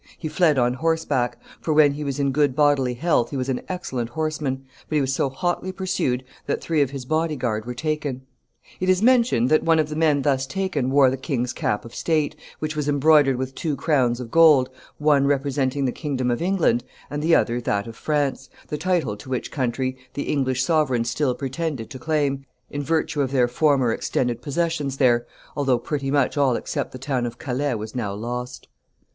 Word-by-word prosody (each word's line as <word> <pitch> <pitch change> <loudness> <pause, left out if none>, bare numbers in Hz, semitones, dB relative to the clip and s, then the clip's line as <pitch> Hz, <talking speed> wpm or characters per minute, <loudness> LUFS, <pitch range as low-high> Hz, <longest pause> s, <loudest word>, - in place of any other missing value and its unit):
He 160 - -5
fled 155 -2 +3
on 125 -1 +3
horseback 145 -4 0 0.2
for 155 - -1
when 150 -2 +6
he 150 +1 -5
was 140 -1 -3
in 140 -1 +1
good 145 -2 +2
bodily 140 -4 +3
health 135 -4 +1
he 140 - -4
was 130 +1 -2
an 130 - -1
excellent 130 -10 -3
horseman 145 -2 -3 0.2
but 155 - -1
he - - +4
was 135 -1 0
so 135 - +1
hotly 175 +6 -2
pursued 180 -9 -1 0.2
that - - 0
three 160 -3 0
of 140 - +2
his 135 -2 -7
body 155 +2 0
guard 110 -5 -2
were 125 0 -5
taken. 150 -2 -3 0.6
It 185 - 0
is 185 +2 +3
mentioned 235 - +4
that 155 - +4
one 165 -1 +3
of 155 -1 +1
the 150 - -4
men 150 -3 +2
thus 135 -2 +1
taken 170 -6 -1
wore 135 -1 +5
the 135 - -2
king's 125 -3 -2
cap 105 - -1
of 115 - -11
state, 155 -2 0 0.2
which 155 0 -4
was 150 -1 -1
embroidered 145 -1 +4
with 130 +1 -4
two 155 +1 -2
crowns 130 -4 +1
of 120 -2 -7
gold, 155 -6 +6 0.3
one 145 -2 +3
representing 140 -1 0
the 125 - +1
kingdom 130 -5 -2
of 120 - -1
England 175 -10 +2 0.3
and 145 0 -3
the 165 +2 +4
other 120 +1 +1
that 100 -3 -1
of 115 - -9
France, 145 -1 -1 0.2
the 150 - -3
title 175 - 0
to 130 - -12
which 130 -1 -3
country 130 -1 -1 0.2
the 145 - -2
English 130 -3 0
sovereigns 130 -6 +1
still 130 0 0
pretended 135 -3 -4
to 130 - -7
claim, 145 -3 0 0.3
in 145 - -3
virtue 160 0 0
of 135 -2 -1
their 125 -3 +3
former 130 -1 +2
extended 120 0 -1
possessions 145 -1 -1
there, 120 -3 +3 0.3
although 135 -3 +2
pretty 140 +3 -3
much 140 0 +1
all 135 -4 +3
except - - -3
the - - -8
town 130 -2 -1
of 120 0 -8
Calais 135 -1 -1
was 110 0 -6
now 115 -5 -2
lost. 125 +4 -5
140 Hz, 205 wpm, -23 LUFS, 125-155 Hz, 0.6 s, when